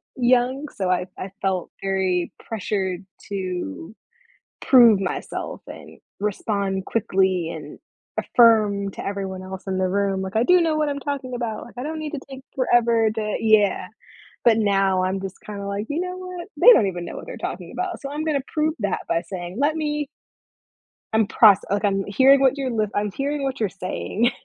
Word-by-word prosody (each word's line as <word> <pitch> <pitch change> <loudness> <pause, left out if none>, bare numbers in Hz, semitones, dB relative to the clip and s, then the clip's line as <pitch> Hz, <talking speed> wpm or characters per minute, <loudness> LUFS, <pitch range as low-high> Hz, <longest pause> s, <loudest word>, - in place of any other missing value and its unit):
young, 255 +3 +2
so 190 -2 -2
I 180 0 +1
I 185 - -6
felt 190 -2 -1
very 190 -2 0
pressured 195 -3 -3 0.2
to 185 - -4 0.7
prove 235 -6 +7
myself 185 -2 -4
and - - -11 0.2
respond 200 -2 -2
quickly 190 -5 +1
and 150 -3 -8 0.4
affirm 210 -4 +4
to - - -8
everyone 195 -2 -4
else 190 0 -8
in 190 -1 -1
the 185 -1 +1
room, 195 0 0
like, 190 +3 -5
"I 230 - +4
do 360 +3 +5
know 315 -2 +1
what 305 -1 +1
I'm 280 0 -3
talking 270 -3 -4
about, 230 -3 -4
like 240 - -15
I 250 - -4
don't 315 +1 -4
need 305 -1 -5
to 285 - -3
take 265 0 -9
forever 235 -3 +3
to" 215 -1 -2
Yeah, 210 -4 +3 0.6
but 225 -2 +6
now 195 -3 +2
I'm 190 +1 -1
just 190 -1 -7
kinda 200 -1 -7
like, 200 +3 -3
"You 300 +3 -1
know 365 0 -3
what, 365 -1 -7
they - - +9
don't 210 - +4
even 175 -2 -4
know - - -7
what - - -8
they're - - -8
talking - - -5
about." 365 0 -4
So 275 0 -6
I'm 300 +1 -3
gonna 295 -4 0
prove 310 0 +1
that 200 -2 -1
by 165 0 +1
saying, 175 +2 -7
"Let 300 +3 +2
me" 295 -2 -2 1.1
I'm 220 -2 +3
proc 205 -4 +6
like 200 +1 0
I'm 195 -1 +1
hearing 270 +6 +5
what 270 +1 +3
you're 265 -2 -2
l 215 -2 0
I'm 205 -1 0
hearing 280 +4 -2
what 270 -1 -2
you're 210 -4 +1
saying, 200 +5 -1
210 Hz, 190 wpm, -23 LUFS, 190-270 Hz, 1.1 s, they